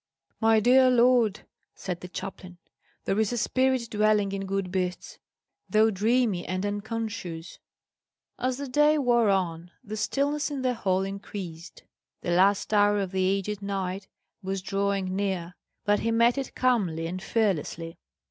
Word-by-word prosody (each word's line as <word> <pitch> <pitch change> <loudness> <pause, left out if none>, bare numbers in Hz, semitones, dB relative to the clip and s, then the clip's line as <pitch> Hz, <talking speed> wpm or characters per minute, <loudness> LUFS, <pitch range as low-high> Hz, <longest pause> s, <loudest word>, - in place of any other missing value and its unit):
"My 225 0 +4
dear 255 +3 +5
lord," 240 -4 +3 0.3
said 180 -2 -5
the 180 - -7
chaplain, 180 0 -8 0.5
"there 195 - 0
is 220 0 +1
a 240 - -2
spirit 260 +1 +1
dwelling 210 -1 +2
in 195 0 -4
good 195 -2 -2
beasts, 180 -1 -3 0.5
though 220 +1 +4
dreamy 215 -2 +1
and 185 +2 -3
unconscious." 205 -5 -5 0.8
As 255 0 -1
the 280 0 -5
day 295 +4 +4
wore 240 -5 +3
on, 175 -3 -1
the 215 -2 -6
stillness 285 +6 0
in 280 -3 -4
the 255 -1 +2
hall 190 -5 0
increased. 195 -4 -7 0.4
The 175 - -2
last 195 +4 +3
hour 205 0 +4
of 195 -2 -2
the 190 -1 +1
aged 200 +1 -2
knight 195 -1 -3 0.3
was 190 -1 -3
drawing 195 -1 -1
near, 190 -3 -2 0.3
but 205 -1 +3
he 230 - -1
met 235 +1 +4
it 270 - -6
calmly 195 -11 +1
and 180 +3 -4
fearlessly. 170 -6 -1
200 Hz, 150 wpm, -27 LUFS, 185-230 Hz, 0.8 s, dear